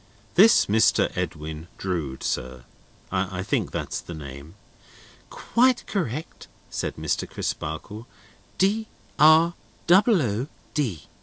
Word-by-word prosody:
This 215 +5 +6
Mr. 110 +2 +3
Edwin 80 -2 -4
Drood, 80 -9 -3
sir: 65 0 -3 0.5
I - - -2
think - - -1
that's - - -4
the 85 - -8
name?" 70 +3 -10 0.7
"Quite 250 +1 +2
correct," 160 - -4 0.2
said - - -3
Mr. - - -2
Crisparkle. 105 +9 -5 0.5
"D 215 +3 +1 0.3
r 160 +2 +6 0.3
double 190 - +5
o 115 +3 -2 0.3
d." 115 - -1
110 Hz, 105 wpm, -25 LUFS, -, 0.7 s, This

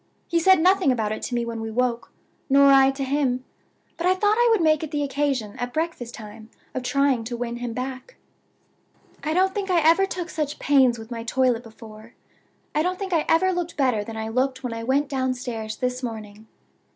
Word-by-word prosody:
He 340 - +1
said 375 +1 +5
nothing 370 -3 +4
about 220 -4 -1
it 215 - -4
to 245 - -3
me 240 0 0
when 230 -1 -5
we 225 - -4
woke, 240 +1 -1 0.4
nor 280 +1 +6
I 270 0 +6
to 270 0 -3
him. 260 -2 0 0.5
But 345 - -1
I 370 - +4
thought 415 +2 +2
I 480 +1 +3
would 445 -2 +3
make 310 -2 +3
it 315 - -4
the 295 -1 -1
occasion, 270 -6 -1
at 245 0 -4
breakfast 315 -7 -3
time, 220 0 -11 0.2
of 255 - -3
trying 275 -2 +1
to 240 +1 -4
win 240 0 -4
him 240 -1 -4
back. 260 - -6 1.1
"I 310 +1 -1
don't 380 +1 +2
think 400 -2 -3
I 355 -2 +4
ever 390 +4 +4
took 360 -2 -5
such 300 -3 -3
pains 265 -4 +3
with 225 +1 -11
my 230 -1 -5
toilet 245 0 +1
before. 225 0 -14 0.6
I 300 - +2
don't 365 +3 -1
think 385 -2 -4
I 320 -2 +2
ever 375 +3 +4
looked 350 -2 -4
better 250 -7 +1
than 220 +1 -8
I 220 0 -4
looked 260 +3 -1
when 245 -2 -3
I 230 0 -5
went 275 +4 +1
downstairs 250 -5 -3
this 250 0 -2
morning. 220 -3 -7
260 Hz, 210 wpm, -24 LUFS, 235-315 Hz, 1.1 s, nor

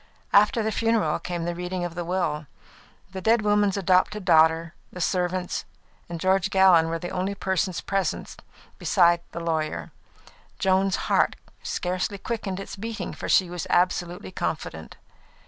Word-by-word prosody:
After 210 +3 +5
the 220 - 0
funeral 225 0 +1
came 175 -2 -4
the 175 - -1
reading 180 +1 -3
of 175 - -5
the 175 +1 -4
will. 165 -4 -2 0.6
The 190 -1 -6
dead 225 +2 +3
woman's 205 -1 +2
adopted 190 +2 +2
daughter, 160 -1 +4 0.2
the 180 - -9
servants, 180 0 -1 0.5
and 170 -1 -5
George 190 +2 +2
Gallon 185 -4 +5
were 165 - -1
the 175 +2 -6
only 190 +2 -2
persons 190 -3 -1
present 195 -1 -2 0.4
besides 170 -2 +4
the - - -5
lawyer. 160 -2 -2 0.7
Joan's 190 0 +2
heart - - +2 0.3
scarcely 185 +3 -2
quickened 200 -3 -4
its 195 - -7
beating, 220 +2 -5
for - - -6
she 185 - +4
was 175 -2 -5
absolutely 180 +1 0
confident. 80 - -4
185 Hz, 145 wpm, -25 LUFS, 170-195 Hz, 0.7 s, After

